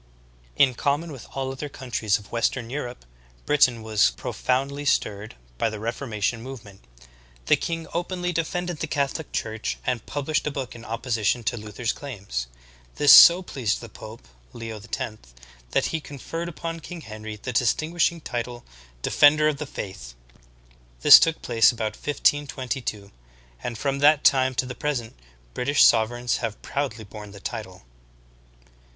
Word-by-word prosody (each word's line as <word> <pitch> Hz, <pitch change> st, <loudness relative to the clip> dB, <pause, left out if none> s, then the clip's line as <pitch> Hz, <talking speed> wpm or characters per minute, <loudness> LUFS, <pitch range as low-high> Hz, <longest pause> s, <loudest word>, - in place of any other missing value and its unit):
In 135 Hz, -2 st, +4 dB
com 140 Hz, +5 st, 0 dB
mon 170 Hz, -1 st, -8 dB
with 130 Hz, -6 st, -10 dB
all 135 Hz, -1 st, -2 dB
other 140 Hz, +2 st, -6 dB
countries 115 Hz, -6 st, -1 dB
of 100 Hz, -1 st, -15 dB
western 115 Hz, 0 st, -1 dB
Europe, 125 Hz, -, -5 dB, 0.4 s
Britain 125 Hz, -6 st, +3 dB
was 110 Hz, -2 st, +3 dB
profoundly 140 Hz, +3 st, -2 dB
stirred 105 Hz, -6 st, -1 dB, 0.2 s
by -, -, +2 dB
the 110 Hz, -1 st, -7 dB
reformation 115 Hz, -1 st, -2 dB
movement. 110 Hz, -6 st, -10 dB, 0.6 s
The -, -, +5 dB
king 165 Hz, -1 st, -4 dB
openly 180 Hz, +1 st, -2 dB
defended 175 Hz, 0 st, -2 dB
the 160 Hz, -, -2 dB
Catholic 145 Hz, +2 st, -2 dB
Church 110 Hz, -1 st, -3 dB
and 125 Hz, -4 st, -1 dB
published 150 Hz, +2 st, -1 dB
a -, -, +2 dB
book 135 Hz, -3 st, -5 dB
in 115 Hz, -, -11 dB
opposition 115 Hz, 0 st, -1 dB
to 120 Hz, +2 st, -1 dB
Luther's 110 Hz, +1 st, -3 dB
claims. 100 Hz, -, -5 dB, 0.5 s
This 145 Hz, -2 st, +7 dB
so 175 Hz, +2 st, +10 dB
pleased 130 Hz, -, -2 dB
the -, -, -10 dB
pope, -, -, -11 dB, 0.3 s
Leo 115 Hz, -2 st, -7 dB
X, 110 Hz, 0 st, -5 dB, 0.5 s
that -, -, +1 dB
he 160 Hz, -, -1 dB
conferred 165 Hz, +4 st, -6 dB
upon 165 Hz, +2 st, -5 dB
King 170 Hz, +1 st, -9 dB
Henry 110 Hz, -3 st, -8 dB
the 125 Hz, +4 st, -6 dB
distinguishing 160 Hz, +8 st, +1 dB
title, 120 Hz, -2 st, -5 dB, 0.4 s
"Defender 150 Hz, +1 st, +5 dB
of 150 Hz, -2 st, 0 dB
the 150 Hz, -, -5 dB
Faith." 95 Hz, -, -7 dB, 0.9 s
This -, -, +11 dB
took 165 Hz, 0 st, +1 dB
place 115 Hz, 0 st, +5 dB
about 110 Hz, -2 st, -3 dB
1522, 135 Hz, -7 st, -1 dB, 0.5 s
and 120 Hz, -2 st, -4 dB
from 140 Hz, +2 st, -1 dB
that 145 Hz, +1 st, +5 dB
time 130 Hz, -1 st, +4 dB
to 130 Hz, -, 0 dB
the 125 Hz, -, -6 dB
present, 125 Hz, -4 st, -3 dB, 0.4 s
British 140 Hz, +4 st, +3 dB
sovereigns 120 Hz, +1 st, +3 dB
have 115 Hz, -3 st, -4 dB
proudly 135 Hz, -6 st, -3 dB
borne 105 Hz, 0 st, -10 dB
the 100 Hz, -, -11 dB
title. 100 Hz, -, -7 dB
125 Hz, 150 wpm, -25 LUFS, 110-145 Hz, 0.9 s, This